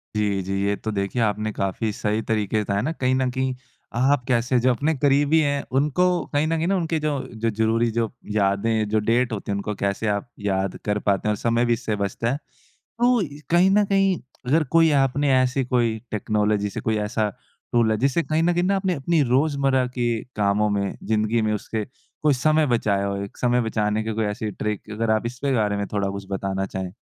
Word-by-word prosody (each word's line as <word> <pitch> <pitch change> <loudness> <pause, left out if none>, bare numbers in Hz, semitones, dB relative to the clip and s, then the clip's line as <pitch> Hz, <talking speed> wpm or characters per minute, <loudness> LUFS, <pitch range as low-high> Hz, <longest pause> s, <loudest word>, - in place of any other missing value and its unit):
जी, 105 -2 0
जी, 95 +1 -4
ये 100 - +1
तो 110 - -4
देखिए, 100 +4 -1
आपने 105 0 0
काफ़ी 100 +3 -2
सही 105 +2 -1
तरीके 110 -1 -1
से - - +2
बताया 100 0 -1
ना, 150 - -1
कहीं 130 -5 0
न 130 -1 +1
कहीं 130 0 -1 0.4
आप 130 +1 +2
कैसे 125 0 +2
जो 130 +1 +3
अपने 145 +6 0
करीबी 145 +3 +3
हैं, 140 -2 0 0.2
उनको 150 +5 +2 0.3
कहीं 145 +2 +2
न 165 - +1
कहीं 165 +2 0
ना, 195 - +2
उनके 165 -3 0
जो 150 -2 -1 0.3
ज़रुरी 110 +2 +1
जो 115 0 -1 0.2
यादें, 105 +2 +1
जो 110 0 +2
डेट 115 +3 +1
होती 100 -1 -4
हैं, - - 0
उनको 105 +1 -3
कैसे 100 +2 -1
आप 120 +5 -5
याद 95 -2 -1
कर 105 0 0
पाते 100 +1 0
हैं - - +3
और - - -4
समय 115 +1 +1
भी 120 - +3
इससे 115 -2 -2
बचता 100 +4 -2
है। 140 - -1 0.4
तो 245 +1 +1 0.3
कहीं 175 +3 +5
न 205 +1 +4
कहीं, 195 -1 +2 0.3
अगर 155 +4 +3
कोई 165 -1 +6
आपने 140 +1 +1
ऐसी 130 +1 +2
कोई 120 -3 +1
टेक्नोलॉजी 105 -1 0
से - - -5
कोई 110 -1 0
ऐसा 110 -1 0 0.5
रूल 115 -2 +4
है, 110 - +2
जिससे 135 +7 +2
कहीं 160 0 0
न 175 +1 +3
कहीं 175 +1 +1
ना 195 +2 +2
आपने 190 -2 0
अपनी 160 +2 +1
रोज़मर्रा 135 -2 +2
के 120 -2 0 0.3
कामों 105 +1 +2
में, 100 -1 -1
ज़िंदगी 110 +1 +1
में 110 0 +1
उससे 105 +1 -3 0.4
कोई 150 -2 +4
समय 155 +4 +2
बचाया 105 -5 +1
हो, 100 - -2
एक 100 - -8
समय 125 0 +2
बचाने 110 -2 0
की 110 - -2
कोई 110 0 0
ऐसी 105 +1 -3
ट्रिक? 105 0 -4
अगर 110 +1 -1
आप 110 +1 +1
इसके 125 +3 -2
बारे 105 -3 +1
में 100 0 -2
थोड़ा 100 -1 0
कुछ 100 0 -7
बताना 95 0 -2
चाहें। 95 -1 -5
115 Hz, 215 wpm, -23 LUFS, 105-140 Hz, 0.5 s, कोई